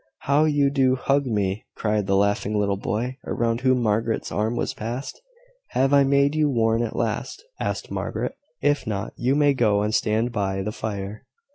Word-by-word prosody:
"How 145 +3 +3
you 145 -2 +2
do 130 -2 +3
hug 140 +1 +1
me!" 105 -2 -1
cried 105 -2 0
the 100 - +2
laughing 100 +1 +1
little 100 -1 +1
boy, 120 +6 -3
around 115 0 0
whom 130 -2 +2
Margaret's 110 +1 0
arm 110 +3 0
was - - -1
passed. 120 - -5 0.5
"Have 135 +2 +2
I 140 -1 +6
made 140 +1 +3
you 155 -1 +2
warm 115 -3 +2
at 115 - -4
last?" 115 - -2 0.2
asked - - -3
Margaret. - - -3 0.3
"If 145 -4 +1
not, 105 -1 -3
you 130 +3 +1
may 145 -1 +4
go 105 -5 +2
and 105 +1 -1
stand 110 +3 +1
by 95 -3 -1
the 105 - -3
fire." 105 -1 -5
115 Hz, 180 wpm, -24 LUFS, 105-135 Hz, 0.5 s, I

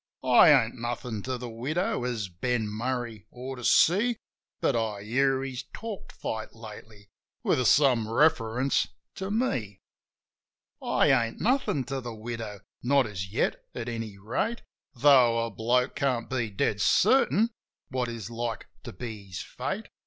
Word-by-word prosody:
I - - +7
ain't - - +4
nothin' 120 -2 -4
to 130 -1 -2
the 125 0 -6
widow, 130 +6 -2
as 115 -5 -2
Ben 110 +5 -1
Murray 115 0 -4
ought 130 +2 -7
to 125 - -9
see; 210 - +4 0.4
But - - +1
I 110 -3 -2
hear 135 +4 +1
he's 130 -1 -5
talked 220 -3 -7
fight 110 0 -5
lately, 110 -2 -12 0.3
with 130 - +2
some 125 -6 +4
reference 130 -1 +2 0.3
to 190 0 -5
me. 130 - -1 1.0
I - - +3
ain't 115 -4 +1
nothin' 245 - +1
to 135 +1 -4
the 120 -2 -6
widow 110 -3 -6
— - - -67
not 140 -2 +5
as 95 -3 -5
yet, 115 - 0
at 115 -1 -4
any 115 -4 -5
rate; 155 - -2 0.3
Tho' 120 -3 +5
a 115 - -6
bloke 120 +5 +1
can't 125 -4 0
be 120 -4 -1
dead 100 0 -1
certain 230 - +4 0.4
what 130 -1 -1
is 115 -2 -6
like 115 -1 -3 0.2
to - - -8
be 105 -1 -7
his 90 -2 -6
fate. - - -4
120 Hz, 155 wpm, -28 LUFS, 110-135 Hz, 1.0 s, I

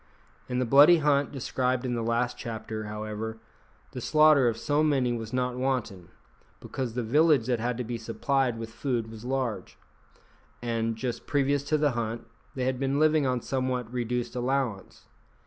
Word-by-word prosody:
In 125 - -1
the 125 - +1
bloody 145 +8 +7
hunt 145 -2 +2
described 130 -1 -1
in 125 - -1
the 120 - -1
last 115 +2 0
chapter, 110 -1 -6
however, 110 +1 -5 0.5
the 125 - -6
slaughter 150 -2 +5
of 115 -1 0
so 145 +4 +1
many 135 -5 +2
was 115 -2 -5
not 125 -1 -1
wanton, 125 -10 -2 0.5
because 125 -4 -5
the 125 - -1
village 145 +1 +3
that 125 -2 0
had 120 +1 -2
to 125 - -2
be 120 0 -5
supplied 120 +2 0
with 115 0 -6
food 120 -4 -2
was 110 0 -10
large, 125 -7 -3 0.8
and, 115 -1 -1
just 120 +1 -4
previous 140 -1 +1
to 155 +1 +1
the 150 -1 +2
hunt, 115 -1 -3 0.3
they 130 -2 -1
had 130 -1 -1
been 135 +1 0
living 155 -2 +3
on 125 -1 0
somewhat 130 -3 -2
reduced 120 0 -2
allowance. 125 -5 -2
125 Hz, 170 wpm, -27 LUFS, 115-135 Hz, 0.8 s, bloody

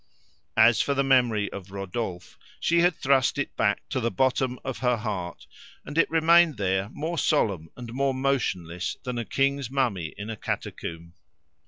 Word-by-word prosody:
As 110 +1 +6
for 140 - 0
the 140 - +2
memory 125 -6 +2
of 95 -1 -8
Rodolphe, 95 -1 -5 0.2
she 170 +1 +2
had 175 -1 +4
thrust 135 -2 +2
it - - -3
back - - 0
to - - -1
the 115 -1 0
bottom 130 0 +1
of 135 -2 -4
her 125 -2 +2
heart, 100 -6 -5 0.4
and 145 - -8
it 165 - +3
remained 165 -2 +5
there 95 0 0
more 160 +6 -3
solemn 100 - +1
and 120 -2 -8
more 135 0 0
motionless 95 -10 -1
than 125 -1 -3
a 115 - -3
king's 140 -2 0
mummy 115 - -1
in 105 +2 -5
a - - -4
catacomb. 85 -5 -5
125 Hz, 170 wpm, -26 LUFS, 100-135 Hz, 0.4 s, As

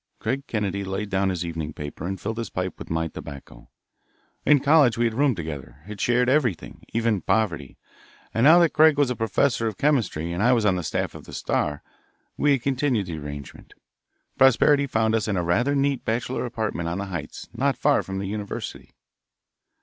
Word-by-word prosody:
Craig 140 +1 -3
Kennedy 100 -3 -2
laid 95 +2 -4
down 95 0 +1
his 90 -2 -2
evening 80 -2 -4
paper 75 +3 -6
and 95 0 -4
filled 110 +5 -4
his 115 - -4
pipe 95 0 -4
with - - -9
my 80 0 -1
tobacco. 70 -3 -11 0.8
In 145 0 +6
college 140 -4 +4
we 120 - +2
had 115 - 0
roomed 135 0 +2
together, 75 -3 -7
had 105 -1 -8
shared 125 0 +2
everything, 130 - 0
even 115 -4 0
poverty, 85 -11 -1 0.6
and 115 - +1
now 160 +5 +8
that 170 -2 +4
Craig 155 -1 +5
was 145 -3 +2
a - - -2
professor 115 +2 +1
of 105 -4 -4
chemistry 105 - 0
and 90 - -2
I 120 +3 +4
was 115 -3 +1
on 95 -3 +3
the 90 - -2
staff 80 - -2
of - - -11
the - - -12
Star, 75 -1 -1 0.5
we 145 -1 +3
had 130 -3 -1
continued 130 -6 0
the 85 -3 -5
arrangement. 70 -1 -9 0.6
Prosperity 140 +2 +5
found 110 -3 +1
us 115 -1 0
in 100 -3 0
a 90 - 0
rather 120 +12 +1
neat 140 -2 0
bachelor 120 +3 -2
apartment 105 -8 -3
on 85 - -3
the 100 - -3
Heights, 90 -4 -6
not - - 0
far - - +3
from 95 0 -6
the 95 - -3
University. 100 +1 -6
110 Hz, 195 wpm, -24 LUFS, 90-130 Hz, 0.8 s, now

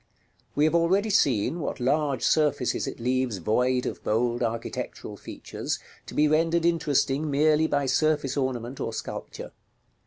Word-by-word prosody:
We 145 - +2
have 155 - +2
already 190 +6 +2
seen 140 - +2
what 150 - -4
large 140 0 0
surfaces 145 -5 +1
it - - -6
leaves 125 -2 0
void 125 +7 +1
of - - -5
bold 120 +2 0
architectural 115 -1 -4
features, - - -5 0.3
to - - -9
be 150 - +4
rendered 165 +2 +2
interesting 150 -3 +1
merely 155 +2 +3
by 145 -2 0
surface 150 0 +1
ornament 130 -2 -2
or 115 - -3
sculpture. - - -6
140 Hz, 145 wpm, -26 LUFS, 125-155 Hz, 0.3 s, be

